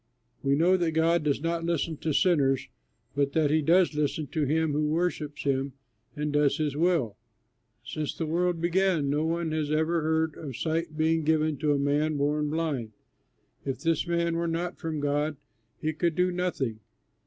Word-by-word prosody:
We 140 Hz, 0 st, +2 dB
know 175 Hz, +5 st, +4 dB
that 170 Hz, -3 st, 0 dB
God 165 Hz, +2 st, +3 dB
does 145 Hz, -2 st, 0 dB
not 165 Hz, 0 st, -1 dB
listen 165 Hz, -1 st, -1 dB
to 160 Hz, -, -2 dB
sinners 140 Hz, -6 st, +2 dB, 0.5 s
but 140 Hz, 0 st, +1 dB
that 155 Hz, -3 st, +2 dB
he 155 Hz, +1 st, +3 dB
does 170 Hz, +3 st, +4 dB
listen 150 Hz, +1 st, -1 dB
to 155 Hz, -3 st, 0 dB
him 160 Hz, +2 st, +1 dB
who 150 Hz, +1 st, +1 dB
worships 155 Hz, -2 st, -1 dB
him 135 Hz, -1 st, 0 dB, 0.4 s
and 150 Hz, 0 st, -2 dB
does 145 Hz, -1 st, +3 dB
his 150 Hz, -3 st, -1 dB
will. 155 Hz, -, +1 dB, 0.7 s
Since 155 Hz, +2 st, -4 dB
the 165 Hz, -, -2 dB
world 175 Hz, +2 st, 0 dB
began 170 Hz, -4 st, +1 dB
no 150 Hz, +2 st, +1 dB
one 165 Hz, -1 st, -1 dB
has 155 Hz, -2 st, -1 dB
ever 160 Hz, +2 st, +1 dB
heard 160 Hz, 0 st, +1 dB
of 135 Hz, -6 st, -7 dB
sight 160 Hz, -1 st, -2 dB
being 160 Hz, 0 st, +2 dB
given 155 Hz, 0 st, +2 dB
to 150 Hz, +2 st, +1 dB
a -, -, +1 dB
man 145 Hz, +2 st, +1 dB
born 150 Hz, +1 st, 0 dB
blind. 145 Hz, -8 st, -2 dB, 0.7 s
If 135 Hz, -2 st, -4 dB
this 165 Hz, 0 st, +1 dB
man 170 Hz, -1 st, 0 dB
were 170 Hz, 0 st, -1 dB
not 170 Hz, +2 st, -3 dB
from 160 Hz, -3 st, -3 dB
God, 145 Hz, +1 st, 0 dB, 0.4 s
he 155 Hz, +1 st, -1 dB
could 170 Hz, +1 st, 0 dB
do 180 Hz, 0 st, +2 dB
nothing." 175 Hz, -11 st, -2 dB
155 Hz, 180 wpm, -28 LUFS, 145-165 Hz, 0.7 s, know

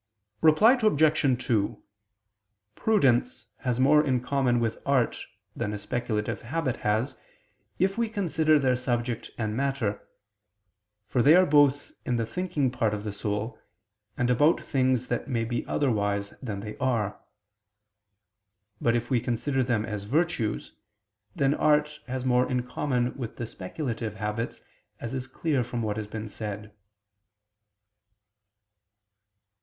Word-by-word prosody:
Reply 210 Hz, -, +6 dB
Obj. 150 Hz, -, +3 dB
2: 105 Hz, -4 st, 0 dB, 0.9 s
Prudence 205 Hz, -, +2 dB
has 125 Hz, -1 st, -2 dB
more 150 Hz, +3 st, +5 dB
in 130 Hz, -4 st, +1 dB
common 125 Hz, -1 st, +1 dB
with 115 Hz, -1 st, -1 dB
art 130 Hz, -4 st, +1 dB, 0.3 s
than 105 Hz, -, -2 dB
a -, -, -3 dB
speculative 105 Hz, 0 st, -2 dB
habit 130 Hz, +1 st, -2 dB
has, 110 Hz, +6 st, 0 dB, 0.6 s
if 195 Hz, +4 st, +1 dB
we 230 Hz, -1 st, +1 dB
consider 160 Hz, -7 st, +2 dB
their 130 Hz, -3 st, +2 dB
subject 120 Hz, -1 st, -2 dB
and 110 Hz, -2 st, -2 dB
matter: 130 Hz, -6 st, -1 dB, 1.1 s
for 120 Hz, +3 st, +1 dB
they 150 Hz, +6 st, +7 dB
are 185 Hz, +1 st, +6 dB
both 145 Hz, -2 st, +3 dB
in 125 Hz, -, -1 dB
the 115 Hz, -1 st, 0 dB
thinking 150 Hz, 0 st, -1 dB
part 115 Hz, -4 st, 0 dB
of 105 Hz, -, -6 dB
the 105 Hz, -2 st, -4 dB
soul, 105 Hz, +2 st, -3 dB, 0.6 s
and 120 Hz, 0 st, +2 dB
about 145 Hz, +7 st, +4 dB
things 130 Hz, -2 st, 0 dB
that 120 Hz, -, -2 dB
may 115 Hz, -4 st, -1 dB
be 120 Hz, +1 st, -2 dB
otherwise 100 Hz, -7 st, 0 dB
than 105 Hz, -7 st, -4 dB
they 105 Hz, +1 st, -7 dB
are. 115 Hz, -6 st, -1 dB, 1.6 s
But 115 Hz, 0 st, +2 dB
if 120 Hz, +2 st, -2 dB
we 125 Hz, -, +4 dB
consider 130 Hz, +3 st, -1 dB
them 120 Hz, -4 st, 0 dB
as 105 Hz, -3 st, -5 dB
virtues, 140 Hz, -3 st, -1 dB, 0.6 s
then 140 Hz, 0 st, +2 dB
art 150 Hz, 0 st, +2 dB
has 130 Hz, 0 st, -3 dB
more 125 Hz, 0 st, +3 dB
in 125 Hz, -1 st, 0 dB
common 125 Hz, -1 st, -1 dB
with 120 Hz, -5 st, -6 dB
the 120 Hz, -, -3 dB
speculative 115 Hz, -, -5 dB
habits, 105 Hz, +2 st, -4 dB, 0.4 s
as 115 Hz, -, -5 dB
is 130 Hz, -1 st, -4 dB
clear 135 Hz, 0 st, 0 dB
from 120 Hz, -1 st, -4 dB
what 105 Hz, -1 st, -2 dB
has 105 Hz, -1 st, -4 dB
been 110 Hz, +1 st, -6 dB
said. 105 Hz, -1 st, -6 dB
125 Hz, 140 wpm, -27 LUFS, 110-145 Hz, 1.6 s, they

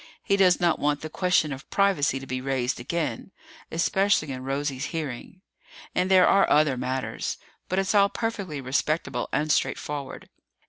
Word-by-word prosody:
He 200 Hz, -, +2 dB
does 185 Hz, -2 st, +4 dB
not 170 Hz, -2 st, +2 dB
want 145 Hz, 0 st, 0 dB
the 155 Hz, -, -7 dB
question 180 Hz, -5 st, +1 dB
of 135 Hz, 0 st, -10 dB
privacy 190 Hz, -9 st, +2 dB
to 135 Hz, -, -9 dB
be 130 Hz, -1 st, -4 dB
raised 130 Hz, -2 st, -1 dB
again 165 Hz, +8 st, -3 dB, 0.4 s
especially 175 Hz, -2 st, +1 dB
in 130 Hz, -1 st, -6 dB
Rosie's 135 Hz, 0 st, -2 dB
hearing. 160 Hz, +2 st, -6 dB, 0.5 s
And 180 Hz, +1 st, 0 dB
there 185 Hz, -1 st, +6 dB
are 195 Hz, 0 st, +4 dB
other 150 Hz, -2 st, +4 dB
matters. 130 Hz, +1 st, -3 dB, 0.3 s
But 185 Hz, -, -1 dB
it's 195 Hz, +1 st, +1 dB
all 200 Hz, -1 st, +5 dB
perfectly 200 Hz, -12 st, -4 dB
respectable 145 Hz, +5 st, -1 dB
and 150 Hz, +1 st, 0 dB
straightforward. 145 Hz, -1 st, -2 dB
155 Hz, 155 wpm, -26 LUFS, 135-185 Hz, 0.5 s, there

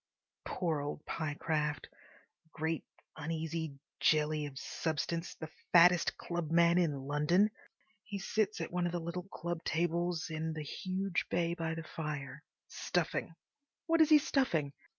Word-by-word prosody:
Poor 165 Hz, -5 st, -1 dB
old 145 Hz, +1 st, -5 dB
Pyecraft! 150 Hz, -1 st, -1 dB, 0.6 s
Great, 160 Hz, +1 st, -2 dB, 0.3 s
uneasy 160 Hz, -1 st, -3 dB, 0.2 s
jelly 155 Hz, -1 st, +3 dB
of 135 Hz, -2 st, -10 dB
substance! 165 Hz, +4 st, -2 dB
The 160 Hz, -1 st, -7 dB, 0.2 s
fattest 175 Hz, 0 st, +6 dB
clubman 170 Hz, 0 st, +3 dB
in 150 Hz, -6 st, +1 dB
London. 150 Hz, +9 st, +3 dB, 0.5 s
He 205 Hz, -2 st, -5 dB
sits 210 Hz, +1 st, 0 dB
at 165 Hz, -, -4 dB
one 175 Hz, 0 st, +1 dB
of 175 Hz, -, -4 dB
the 175 Hz, -, 0 dB
little 170 Hz, +2 st, -4 dB
club 170 Hz, 0 st, -4 dB
tables 170 Hz, 0 st, 0 dB
in 160 Hz, 0 st, -2 dB
the 155 Hz, -1 st, -4 dB
huge 185 Hz, +4 st, -2 dB
bay 170 Hz, -1 st, +1 dB
by 165 Hz, -2 st, -2 dB
the 165 Hz, -, -5 dB
fire, 150 Hz, -3 st, -5 dB, 0.2 s
stuffing. 165 Hz, -1 st, -1 dB, 0.5 s
What 330 Hz, 0 st, +4 dB
is 315 Hz, -, +6 dB
he 305 Hz, -, +9 dB
stuffing? 170 Hz, -, +1 dB
165 Hz, 135 wpm, -34 LUFS, 155-175 Hz, 0.6 s, he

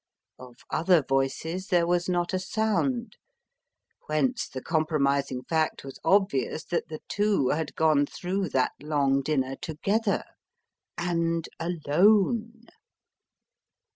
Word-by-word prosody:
Of 125 Hz, -1 st, -12 dB, 0.2 s
other 170 Hz, -2 st, +3 dB
voices 135 Hz, +8 st, -1 dB
there 175 Hz, -4 st, +3 dB
was 175 Hz, +1 st, 0 dB
not 175 Hz, 0 st, 0 dB
a 185 Hz, -, +1 dB
sound: 220 Hz, +4 st, -1 dB, 0.9 s
whence 235 Hz, +12 st, 0 dB
the 130 Hz, -, -6 dB
compromising 140 Hz, -4 st, 0 dB
fact 160 Hz, +3 st, -1 dB
was 135 Hz, -1 st, -9 dB
obvious 190 Hz, -7 st, +2 dB
that 175 Hz, -, -2 dB
the 155 Hz, -1 st, -7 dB
two 205 Hz, -10 st, +1 dB
had 155 Hz, -1 st, -2 dB
gone 155 Hz, -3 st, +3 dB
through 185 Hz, +2 st, -3 dB
that 130 Hz, -2 st, +1 dB
long 140 Hz, -2 st, +1 dB
dinner 135 Hz, -2 st, -1 dB
together, 200 Hz, +7 st, -1 dB, 0.7 s
and 170 Hz, -1 st, -1 dB
alone! 200 Hz, +8 st, +2 dB
165 Hz, 110 wpm, -27 LUFS, 145-195 Hz, 0.9 s, other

